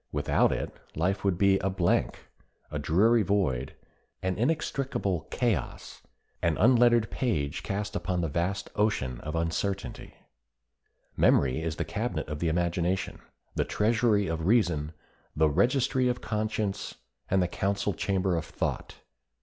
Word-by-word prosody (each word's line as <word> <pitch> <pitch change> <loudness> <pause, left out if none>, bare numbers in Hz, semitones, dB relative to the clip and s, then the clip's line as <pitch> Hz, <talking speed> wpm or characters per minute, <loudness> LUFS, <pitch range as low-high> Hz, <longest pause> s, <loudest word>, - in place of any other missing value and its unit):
Without 75 0 +2
it - - -3 0.2
life 95 +5 0
would 95 -3 +1
be 95 0 +4
a 95 - 0
blank, 90 -2 0 0.4
a 75 - -3
dreary 105 +11 +3
void, 85 -11 0 0.5
an 95 0 0
inextricable 130 - -1
chaos, 115 - -2 0.4
an 85 -2 +1
unlettered 120 -1 +4
page 80 - -1
cast 105 +1 -3
upon 90 -3 -1
the 85 - 0
vast 90 +6 -2
ocean 100 - 0
of 75 +1 -5
uncertainty. 85 +4 -3 1.0
Memory 65 +3 +3
is 80 -1 -2
the - - -2
cabinet - - -3
of 75 0 -4
the 85 - 0
imagination, 85 +2 -1 0.3
the - - +1
treasury 110 -1 +2
of 80 -1 -2
reason, 85 -10 +2 0.4
the 80 +1 +4
registry 125 - +2
of 125 0 0
conscience, 105 -2 -2 0.3
and 95 - +3
the - - 0
council 100 +2 -1
chamber 95 -2 0
of 80 - -2
thought. - - -4
95 Hz, 135 wpm, -28 LUFS, 80-110 Hz, 1.0 s, be